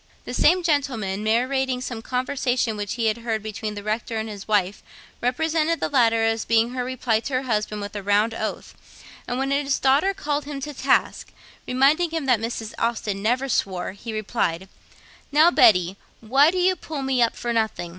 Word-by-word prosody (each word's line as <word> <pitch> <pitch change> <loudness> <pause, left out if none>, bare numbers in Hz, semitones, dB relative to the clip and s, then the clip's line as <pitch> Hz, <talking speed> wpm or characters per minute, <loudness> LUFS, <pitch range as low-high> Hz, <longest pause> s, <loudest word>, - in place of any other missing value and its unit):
The 245 - -6
same 350 +8 +3
gentleman, 255 - -1
narrating 255 +3 +1
some 245 -3 -5
conversation 250 -2 -1
which 205 -1 -4
he 230 -1 -2
had 220 0 +1
heard 225 -2 -3
between 215 0 -5
the 205 - -7
rector 220 +2 -2
and 220 0 -3
his 205 -2 -8
wife, 205 -2 +1 0.4
represented 320 +6 0
the - - -1
latter 230 -4 +3
as 225 0 +1
beginning 230 +1 +2
her 255 -1 -2
reply 245 -3 0
to 265 +4 -6
her 255 - +1
husband 210 -3 -2
with 205 +1 -7
a 205 - -3
round 205 +3 +2
oath; - - -5 0.5
and 245 - -2
when 270 +1 -1
his 280 0 +1
daughter 290 +9 +2
called 295 -6 -2
him 285 -1 -6
to 295 +2 -5
task, - - 0 0.4
reminding 285 +7 +3
him 325 -3 -3
that 250 -4 +3
Mrs. 225 -1 -5
Austen 220 -4 -1
never 250 +5 0
swore, 190 -7 -1
he 210 +4 -8
replied, 195 -5 -2 0.6
'Now, 310 +4 +6
Betty, 180 - +4 0.2
why 270 +7 +4
do 370 - -2
you 365 +1 +3
pull 305 -5 -6
me 265 -2 +1
up 235 - +2
for 240 -1 -3
nothing? 220 -6 -1
235 Hz, 190 wpm, -23 LUFS, 215-275 Hz, 0.6 s, Now